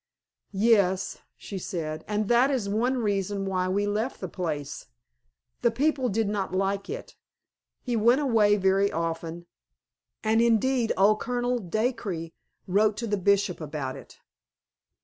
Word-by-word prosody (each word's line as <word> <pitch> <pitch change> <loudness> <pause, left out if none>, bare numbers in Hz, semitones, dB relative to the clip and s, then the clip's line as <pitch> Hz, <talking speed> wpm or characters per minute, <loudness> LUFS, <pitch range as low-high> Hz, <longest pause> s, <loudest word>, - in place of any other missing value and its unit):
"Yes," 195 -3 +2 0.2
she 195 - -7
said; 160 -3 -4
"and 210 0 -1
that 240 +4 +4
is 255 -7 -1
one 235 +6 +1
reason 200 -3 -1
why 185 -1 0
we 200 +2 +1
left 215 +5 -2
the 185 - -4
place. 155 -6 -4 0.7
The 235 - +4
people 265 +1 +1
did 220 +1 0
not 200 -2 -2
like 195 +1 -1
it. 470 +4 -7 0.7
He 245 -2 -1
went 235 +4 +4
away 220 -7 +3
very 195 +1 +2
often; 165 +1 -3 0.8
and, 220 +1 +3
indeed, 235 +1 +2
old 205 +3 +4
Colonel 245 0 -1
Dacre 215 -4 -2 0.4
wrote 210 +3 +2
to 235 - -3
the 210 -2 0
Bishop 200 -2 +1
about 145 -3 -4
it." - - -13
205 Hz, 140 wpm, -27 LUFS, 185-235 Hz, 0.8 s, that